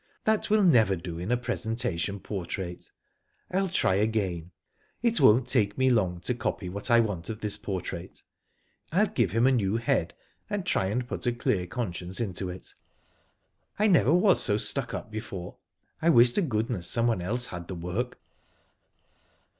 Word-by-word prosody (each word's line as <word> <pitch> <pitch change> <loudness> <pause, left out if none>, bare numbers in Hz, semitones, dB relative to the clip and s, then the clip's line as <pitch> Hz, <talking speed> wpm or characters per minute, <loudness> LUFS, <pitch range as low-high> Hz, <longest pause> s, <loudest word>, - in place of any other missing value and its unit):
That 220 0 +1
will 215 0 +4
never 115 - +5
do 85 -1 -6
in 90 +6 -3
a 125 - +3
presentation 115 -6 -2
portrait. 90 -2 -5 0.6
Til 190 +1 +1
try 165 - +2
again. 95 -5 -1 0.5
It 235 -1 +3
won't 120 +3 +5
take 105 -6 +1
me 130 0 +3
long 90 -7 +1
to 125 - -1
copy 110 -5 -3
what 100 +6 -5
I 120 0 +6
want 100 -7 -1
of 110 -1 -5
this 105 -1 +1
portrait, 95 -2 -6 0.7
ril 195 +7 +4
give 115 -7 +2
him 115 +6 +2
a 135 - +5
new 110 -4 +1
head, 115 - 0 0.3
and 205 -3 -2
try 95 - +1
and 120 +5 -2
put 125 - -4
a - - +3
clear 95 -6 -1
conscience 90 -4 -4
into 95 -4 -3
it. 90 +1 -10 1.0
I 210 - +2
never 175 -8 +4
was 180 +4 +4
so 105 -4 +3
stuck - - -1
up 110 - -7
before. 105 -5 -7 0.4
I 165 - +3
'wish 120 -5 +6
to - - +2
goodness 110 - -2
someone 115 -4 +1
else 120 +7 -1
had 85 -1 -6
the 95 - -5
work." 90 +9 -4
110 Hz, 170 wpm, -27 LUFS, 95-125 Hz, 1.0 s, I